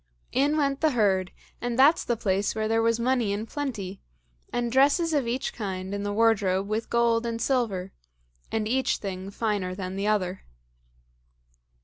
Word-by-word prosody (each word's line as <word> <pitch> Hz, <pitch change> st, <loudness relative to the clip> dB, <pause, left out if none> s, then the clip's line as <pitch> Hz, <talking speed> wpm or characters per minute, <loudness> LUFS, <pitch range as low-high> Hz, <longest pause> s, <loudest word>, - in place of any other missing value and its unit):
In 285 Hz, +4 st, +2 dB
went 275 Hz, -2 st, 0 dB
the 315 Hz, -3 st, +3 dB
herd, 190 Hz, -5 st, +2 dB, 0.3 s
and 240 Hz, -1 st, -2 dB
that's 285 Hz, +5 st, +5 dB
the 240 Hz, -, -1 dB
place 200 Hz, -1 st, 0 dB
where 215 Hz, 0 st, -1 dB
there 225 Hz, +1 st, +2 dB
was 230 Hz, 0 st, +2 dB
money 240 Hz, -3 st, +1 dB
in 205 Hz, +2 st, -2 dB
plenty, 220 Hz, -8 st, -5 dB, 0.5 s
and 240 Hz, -1 st, -1 dB
dresses 285 Hz, +6 st, +3 dB
of 280 Hz, -5 st, +1 dB
each 250 Hz, +3 st, -2 dB
kind 190 Hz, -3 st, -4 dB
in 200 Hz, -, -2 dB
the 205 Hz, 0 st, -2 dB
wardrobe 200 Hz, -3 st, +2 dB
with 215 Hz, +2 st, -2 dB
gold 235 Hz, -1 st, +2 dB
and 230 Hz, -1 st, -3 dB
silver, 215 Hz, -8 st, -1 dB, 0.6 s
and 220 Hz, -1 st, -1 dB
each 260 Hz, +3 st, +1 dB
thing 190 Hz, -1 st, -5 dB
finer 200 Hz, -3 st, -2 dB
than 185 Hz, -1 st, -5 dB
the 200 Hz, +1 st, -1 dB
other. 190 Hz, -3 st, 0 dB
225 Hz, 165 wpm, -26 LUFS, 195-245 Hz, 0.6 s, that's